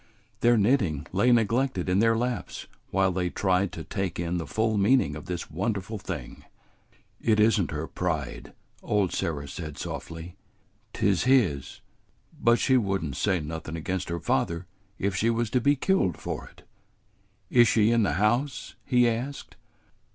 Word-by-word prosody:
Their 120 0 +4
knitting 100 - +2
lay 100 +7 +3
neglected 115 -3 +1
in 90 +1 +2
their 115 +1 +3
laps 120 -4 -3 0.2
while 95 -1 +2
they 90 -1 -1
tried 95 +1 +1
to 80 - -6
take 95 -3 -3
in 85 +1 -1
the 80 - -5
full 110 +5 0
meaning 100 - +3
of 75 - -8
this 90 -3 -5
wonderful 100 +4 -2
thing. - - -7 0.8
"It 110 -2 +2
is 110 -1 +4
n't 85 - -2
her 75 +1 -3
pride," 80 -7 -4 0.3
old 100 -4 0
Sarah 70 -3 -2
said 75 0 -7
softly. 85 +7 -7 0.6
"'T 100 - +2
's 95 - -1
his; 105 - +2 0.6
but 120 0 +5
she 130 +1 +3
would 95 -6 0
n't 70 -5 -4
say 95 +3 +1
nothin' 80 +1 -6
against 90 +3 -3
her 85 0 -2
father 85 +5 -1 0.3
if 100 -1 -1
she 110 +5 +2
was 115 -1 0
to 125 - +2
be 145 +4 +4
killed 135 - +1
for - - -5
it." - - -20 0.9
"Is 120 -1 +6
she 110 0 +3
in 115 -1 +3
the 95 -9 +1
house?" 120 - 0
he 125 -1 +3
asked. 120 +5 -4
95 Hz, 165 wpm, -27 LUFS, 85-115 Hz, 0.9 s, Is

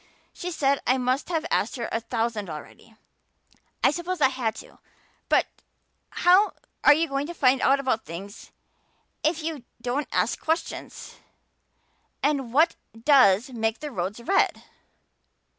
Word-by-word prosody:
She 360 - -5
said 280 -5 +1
I 255 - +4
must 255 +4 -1
have 325 -2 -1
asked 210 - +1
her 235 -3 -3
a 225 - 0
thousand 225 -4 -2
already. 155 +8 -10 0.9
I - - +6
suppose 345 +2 -4
I 265 - +5
had, 250 -4 -2
too, - - -13 0.5
but - - +4 0.6
how 370 +4 +4 0.4
you 320 +3 +3
going 275 0 -2
to 345 - -7
find 260 -3 +3
out 275 +1 +4
about 255 -5 0
things 190 +6 -9 0.7
if 315 +1 0
you 310 -5 -4 0.2
don't 250 +5 -2
ask - - 0
questions? 320 +2 -4 1.1
And 275 -5 0
what 305 +7 +4 0.2
does 245 -2 +5
make 225 -2 -1
the 300 -1 -6
roads 190 +1 -3
red?" 390 +12 +1
265 Hz, 140 wpm, -25 LUFS, 225-305 Hz, 1.1 s, I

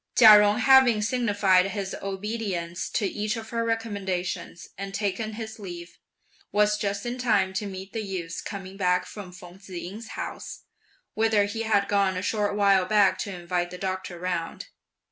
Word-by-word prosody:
Chia 215 -3 +10
Jung 205 0 +3
having 250 -4 +5
signified 205 -5 +3
his 195 -1 -4
obedience 195 -3 -3
to 215 - -1
each 210 +3 -2
of 225 -1 -7
her 230 -1 0
recommendations, 195 -7 -3
and 195 0 -6
taken 215 +2 -2
his 220 0 -7
leave, 175 -3 -9 0.5
was 210 0 +3
just 200 +1 -2
in 245 +1 -3
time 205 -6 +2
to 200 +2 -2
meet 190 0 -8
the 225 - -2
youth 185 -5 -5
coming 195 -1 -7
back 180 -2 +1
from 200 -4 -9
Feng 180 0 -13
Tzu 195 -1 -13
ying's 200 +6 -7
house, - - -6 0.5
whither 220 -2 +3
he 225 +3 -4
had 210 -3 +2
gone 195 -2 +2
a 185 - -3
short 205 -1 0
while 200 -2 +4
back 195 -1 +3
to 200 - -3
invite 175 -1 -2
the 180 - -8
doctor 185 -1 -4
round. 180 - -4
200 Hz, 170 wpm, -26 LUFS, 185-215 Hz, 0.5 s, Chia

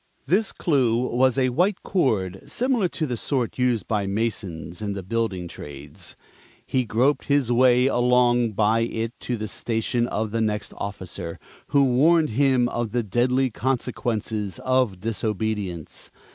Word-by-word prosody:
This 190 +9 +2
Clue 130 -8 +2
was 125 +1 +2
a 130 -1 +3
white 180 +10 +1
cord 100 - 0
similar 245 -6 +1
to 160 - -3
the 125 -4 -2
sort 125 0 -2
used 125 -6 +1
by 105 -3 0
masons 95 -6 -3
(in 100 -1 -2
the 100 -1 -5
building 100 -4 -2
trades). 70 -3 -9 0.5
He 130 -1 0
groped 125 +7 +1
his 140 -4 +2
way 125 +1 +5
along 120 -2 +3
by 110 +2 +3
it 115 0 -2
to 120 - -3
the 110 0 -4
station 115 +2 -1
of 110 -2 -2
the 115 +1 0
next 105 -1 -1
officer, 95 -4 -6 0.3
who 140 -1 +4
warned 150 +4 +4
him 130 0 +3
of 120 -3 -3
the 120 -1 +1
deadly 125 +5 +1
consequences 110 -5 -2
of 130 -7 +2
disobedience. 105 -5 -3
115 Hz, 145 wpm, -24 LUFS, 105-130 Hz, 0.5 s, way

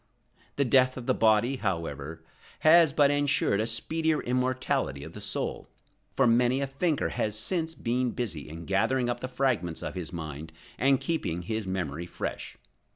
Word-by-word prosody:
The 140 - +1
death 130 +1 +4
of 125 - -6
the - - +2
body, 115 +4 +3
however, 80 - -4 0.4
has 160 0 +7
but 145 -1 +4
ensured 145 -7 +2
a 110 - -1
speedier 155 +7 0
immortality 125 - -1
of - - -9
the - - -9
soul; - - -3 0.5
for 135 - +4
many 120 +2 +3
a 140 - 0
thinker 145 +3 0
has 105 -1 -2
since 165 - -1
been 125 +2 0
busy 95 - -4
in 80 +2 -8
gathering 120 +5 +1
up 120 - -4
the 130 - -4
fragments 120 -11 -1
of - - -4
his 90 -3 -5
mind 80 -2 -7 0.3
and 135 0 +4
keeping 90 - -2
his 110 +2 -3
memory 85 -3 -3
fresh. - - -5
120 Hz, 165 wpm, -28 LUFS, 90-135 Hz, 0.5 s, has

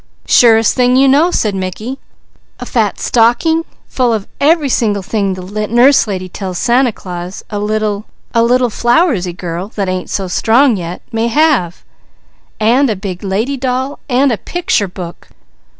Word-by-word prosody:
"Surest 225 -2 +5
thing 250 0 +2
you 270 +1 +5
know!" 290 +6 +4
said 215 - 0
Mickey. 195 +8 -5 0.6
"A - - -6
fat - - -1
stocking 285 +8 +2 0.2
full 250 -2 0
of 210 -3 -3
every 305 0 +3
single 210 -6 0
thing 200 -1 -1
the 205 +3 -4
Nurse 245 +3 +4
Lady 185 -3 -4
tell 185 0 -6
Santa 245 +5 +2
Claus 180 -2 -8
a 205 - -3
little 210 0 -2 0.3
a 230 - +3
little 245 +1 +2
flowersy 240 - +1
girl 175 +1 -5
that 200 -2 -2
ain't 185 0 -3
so 195 -2 -2
strong 230 +7 +3
yet, 175 -1 -6
may 225 0 0
have, 235 - +1 0.8
and 240 +5 +3
a 215 - 0
big 185 -2 -6
lady 215 +8 -1
doll 260 +2 -2
and 260 +2 +3
a 220 - -2
picture 350 - -1
book." 175 -1 -9
225 Hz, 160 wpm, -14 LUFS, 195-255 Hz, 0.8 s, Surest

